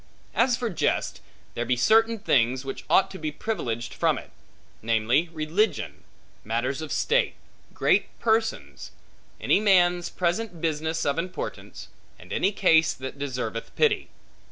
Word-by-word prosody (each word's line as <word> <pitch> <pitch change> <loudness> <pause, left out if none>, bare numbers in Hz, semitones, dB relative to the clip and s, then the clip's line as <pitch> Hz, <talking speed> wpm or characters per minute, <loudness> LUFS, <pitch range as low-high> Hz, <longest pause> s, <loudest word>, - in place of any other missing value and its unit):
As 240 +1 +2
for 240 -3 -2
jest, 170 - -1 0.3
there 120 - -2
be 125 +1 +1
certain 225 - +4
things, 130 - +1
which 135 - -6
ought 190 - +4
to 190 - -8
be 155 -1 -3
privileged 125 - -4
from - - +1
it; - - -10 0.5
namely, 115 +9 +1
religion, 165 +7 -1 0.4
matters 120 +6 -2
of 155 - -6
state, 485 +2 +1 0.4
great - - +2
persons, 225 0 -1 0.5
any - - +3
man's 180 -4 +3
present 180 +1 -2
business 160 0 -1
of 140 +3 0
importance, 180 +2 -6 0.3
and - - -10
any 195 - +2
case 165 -5 +4
that 130 +2 -8
deserveth 125 -5 -4
pity. 425 -3 +2
165 Hz, 135 wpm, -26 LUFS, 130-210 Hz, 0.5 s, certain